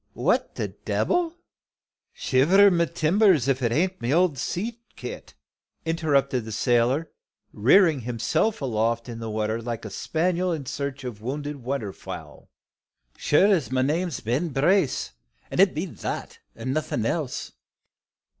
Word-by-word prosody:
what - - 0
de - - -2
debbel!" 350 -1 0 0.8
"Shiver 185 +10 +4
my 170 -1 +3
timbers 170 - +3
if 135 -1 +2
'tain't 160 +10 0
my 120 - -1
old 170 0 +3
sea 220 - -3
kit," 125 - -8 0.5
interrupted 140 -6 +1
the 110 - -7
sailor, 125 +7 +1 0.4
rearing 155 - +5
himself 125 - -1
aloft 115 -1 0
in 115 -2 -7
the 115 -1 -5
water 110 +1 -1
like 115 -1 -5
a 105 - -6
spaniel 180 - 0
in 155 -5 -3
search 140 +1 -4
of 120 -5 -6
wounded 145 +4 -4
waterfowl. 120 -6 -6 0.7
"Sure 150 +6 +3
as 165 -8 0
my 130 0 +1
name's 160 +2 -1
Ben 130 +10 -1
Brace 150 - +1 0.4
it 190 -2 +4
be 160 +5 -1
that, 175 - -6 0.2
an' 125 +3 -3
nothing 140 -7 -1
else!" 145 +1 -2
140 Hz, 135 wpm, -25 LUFS, 120-170 Hz, 0.8 s, rearing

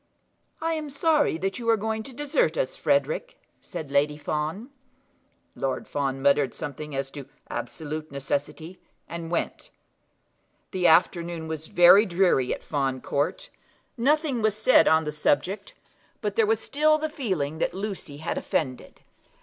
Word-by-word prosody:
"I 325 0 -1
am 310 -2 -4
sorry 295 - +2
that 195 +6 -2
you 230 -1 -2
are 225 - +5
going 220 +1 -2
to 240 - -10
desert 295 - 0
us, - - -1
Frederic," - - 0 0.2
said 150 -3 -7
Lady 145 +1 +2
Fawn. 155 - -3 0.8
Lord 135 -1 -3
Fawn 135 -2 -2
muttered 140 -2 +3
something 150 0 -6
as 135 0 -3
to 140 -2 -9 0.2
absolute 155 0 -5
necessity, 145 +5 -4 0.3
and 170 -1 -6
went. 175 - -3 1.0
The 185 -2 +2
afternoon 170 0 +2
was 160 0 -5
very 180 +5 +7
dreary 175 -8 +2
at - - -4
Fawn 135 -3 -1
Court. 155 - -2 0.4
Nothing 280 0 +1
was 215 -1 +1
said 220 +4 +5
on 160 0 +5
the 150 - -3
subject; 175 - 0 0.4
but - - -3
there 450 -2 +3
was 445 +1 +2
still 310 +2 +2
the 310 0 -2
feeling 185 - -2
that 175 - -1
Lucy 190 -7 -5
had 160 +3 -3
offended. 130 -5 -3
175 Hz, 150 wpm, -26 LUFS, -, 1.0 s, very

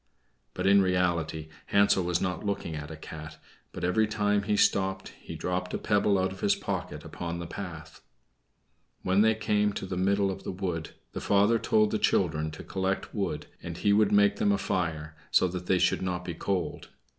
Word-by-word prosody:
But 90 - -2
in 100 0 +6
reality 85 -4 0 0.2
Hansel 100 -1 +4
was 85 0 0
not 90 -1 -2
looking 100 -5 -3
at 75 0 -6
a 80 - -7
cat; 80 0 -9 0.3
but - - -7
every 100 +5 +2
time 105 -1 +1
he 105 0 0
stopped 95 -1 +1
he - - -10
dropped 90 0 -2
a - - 0
pebble 105 -1 +2
out 95 0 0
of 95 - -9
his 100 - +2
pocket - - -4
upon 85 -1 -5
the 85 - -5
path. 80 -4 -8 1.0
When 95 +2 +3
they 110 0 +4
came 105 -1 +1
to - - -4
the 90 -1 -4
middle 100 +1 +2
of 95 - -7
the - - -4
wood 90 -4 -4 0.2
the - - -5
father 105 +3 +3
told 110 -1 +2
the 110 - 0
children 80 -6 +1
to 80 - -9
collect 95 0 -2
wood, 95 -8 -2 0.2
and 85 -1 -6
he 100 +2 +2
would 105 0 +4
make 100 0 +4
them 100 - +2
a 100 - +2
fire, 80 -5 -2
so 95 - +4
that 90 0 -6
they 95 - +3
should 90 0 +2
not 90 -1 -3
be 85 - -4
cold. 90 -1 -3
95 Hz, 200 wpm, -28 LUFS, 85-100 Hz, 1.0 s, in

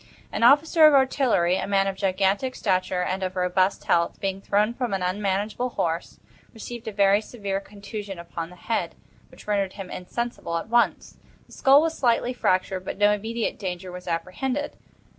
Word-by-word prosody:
An - - -3
officer 310 +6 +6
of 300 - +5
artillery, 255 -10 +3
a - - -3
man 195 -1 +2
of 195 -1 -2
gigantic 195 +6 0
stature 185 -2 0
and 185 +2 -2
of 185 0 -3
robust 185 +1 +1
health, 170 0 +1
being 195 0 -3
thrown 210 +3 +1
from 240 -5 -2
an 190 - -3
unmanageable 205 +5 -1
horse, 165 -7 -3 0.4
received 235 +1 -8
a - - -2
very 200 0 +3
severe 200 -4 -4
contusion 200 -1 -8
upon 170 -1 -6
the 180 - -13
head, 225 +5 -3 0.3
which - - -16
rendered 200 -2 0
him 190 -2 -8
insensible 180 -3 -4
at 165 - -6
once; 235 +1 +1 0.3
the - - -24
skull 275 +2 +5
was 325 0 -1
slightly 240 0 +1
fractured, 185 -4 0
but - - -5
no 205 +1 +4
immediate 220 +2 -2
danger 185 -2 -5
was 180 0 -9
apprehended. 185 +12 -3
200 Hz, 175 wpm, -25 LUFS, 185-235 Hz, 0.4 s, officer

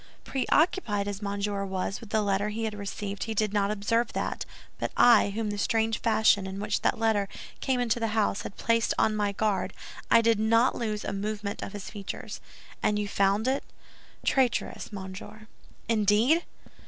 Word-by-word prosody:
"Preoccupied 260 - +1
as 205 0 -4
Monsieur 200 0 -2
was 190 0 -3
with 225 - -11
the 215 0 +1
letter 200 +1 +1
he 220 +2 -4
had 220 -1 -2
received, 205 0 -5
he 225 -1 -4
did 210 -1 +1
not 200 -1 +2
observe 215 +3 0
that; - - -2 0.3
but - - -2
I, 240 -4 +6
whom 210 +1 -2
the 205 - -4
strange 225 +1 +1
fashion 220 -3 +3
in 190 +1 -6
which 210 +1 -1
that - - +1
letter 220 -3 +1 0.3
came 260 -2 0
into 240 -1 +1
the 225 - 0
house 205 -2 +1
had - - -8
placed 230 0 +1
on 215 - +2
my 205 -1 +1
guard—I 215 +2 0
did 230 -2 +3
not 230 +3 +4
lose 215 -3 -3
a - - -2
movement 205 0 -3
of 195 - -6
his 205 -2 -7
features." 200 -2 -7 0.4
"And 210 - +2
you 210 0 -1
found 200 +3 +1
it?" 270 +2 +1 0.6
"Traitorous, 260 -5 +1
monsieur." 200 +2 -8 0.4
"Indeed!" 225 - +3
210 Hz, 175 wpm, -28 LUFS, 200-225 Hz, 0.6 s, I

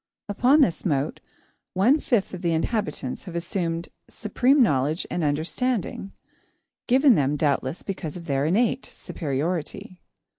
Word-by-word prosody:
Upon 250 +9 +4
this 185 -12 +2
mote, 145 -4 -1 0.6
one 240 +11 +4
fifth 235 -10 0
of 180 - -6
the 170 -2 +1
inhabitants 160 - -2
have 180 -3 -8
assumed 170 -1 -2 0.2
supreme 250 +5 +2
knowledge 145 - +1
and 175 - -1
understanding, 190 - -1 0.8
given 265 +1 +5
them, 145 -5 +1
doubtless, 145 0 -1
because 180 -5 -5
of 170 - -10
their 140 -1 0
innate 225 +9 +1
superiority. 170 +6 -4
175 Hz, 125 wpm, -25 LUFS, 150-220 Hz, 0.8 s, given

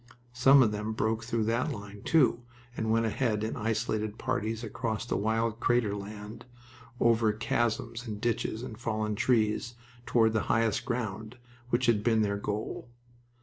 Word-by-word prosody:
Some 135 +2 +6
of 110 - +2
them 105 +1 -3
broke 110 +1 -1
through 115 -1 -1
that 115 +3 0
line, 100 0 -8
too, 130 -7 +3 0.3
and 110 -2 -2
went 115 +1 +3
ahead 110 -1 0
in 110 - -2
isolated 110 -1 -1
parties 110 +2 -2
across 115 0 -3
the - - -2
wild 110 +2 0
crater 115 -4 +2
land, 105 +3 -8 0.6
over 115 -2 +4
chasms 115 +2 -1
and 105 -2 -5
ditches 115 0 -1
and 110 -3 -8
fallen 110 -3 -1
trees, 115 +1 +1 0.3
toward 110 -2 +3
the 110 - +2
highest 115 +1 +2
ground, 110 -2 -3 0.3
which 125 +1 +1
had 110 -3 +3
been 110 -1 +3
their 100 -1 0
goal. 105 +4 -4
110 Hz, 155 wpm, -29 LUFS, 105-120 Hz, 0.6 s, Some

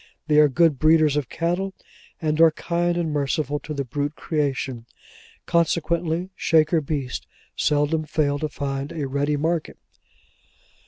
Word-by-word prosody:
They 150 -1 +4
are 150 -1 +6
good 155 -1 +3
breeders 155 -2 +4
of 145 -5 -1
cattle, 175 +3 -2 0.4
and 155 -1 0
are 165 - +8
kind 170 +2 -1
and 165 -3 -1
merciful 145 +1 -1
to 155 - -9
the 140 -2 -2
brute 145 +4 -3
creation. 135 -6 -2 0.6
Consequently, 170 +1 0
Shaker 160 0 +3
beasts 140 -4 -4 0.3
seldom 150 +2 +1
fail 145 -2 0
to 155 - -2
find 140 -1 -4
a 150 -4 -3
ready 145 +2 0
market. 160 +2 -1
155 Hz, 140 wpm, -23 LUFS, 145-165 Hz, 0.6 s, are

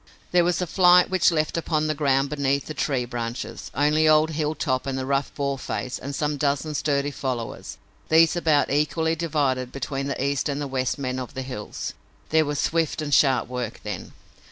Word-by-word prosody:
There 180 -1 +4
was 175 -1 +1
a - - -1
flight 180 +2 +5
which 185 -3 +4
left 155 0 0
upon 155 -2 0
the 155 - +1
ground 140 -1 +1
beneath 140 -1 0
the 155 - -6
tree 135 -4 -1
branches 120 0 -5
only 150 +2 +3
old 155 +1 +4
Hilltop 150 -4 -1
and 135 -1 -2
the 130 - -3
rough 140 +1 0
Boarface 135 -2 -3
and 140 +1 -5
some 150 0 -1
dozen 145 +2 0
sturdy 145 -1 0
followers, 130 -5 -5 0.3
these 160 +1 +5
about 155 -5 +2
equally 160 +3 +1
divided 140 -6 -1
between 135 0 -3
the 140 - -3
East 140 0 0
and 140 0 -2
the 145 - -2
West 130 -2 -1
men 130 -2 -3
of 125 - -7
the 130 - -3
hills. 125 -5 -6 0.4
There 160 0 +3
was 145 -1 -2
swift 165 -1 0
and 150 -2 -2
sharp 135 -4 +4
work 125 0 -5
then. 105 -4 -6
145 Hz, 190 wpm, -24 LUFS, 135-155 Hz, 0.4 s, flight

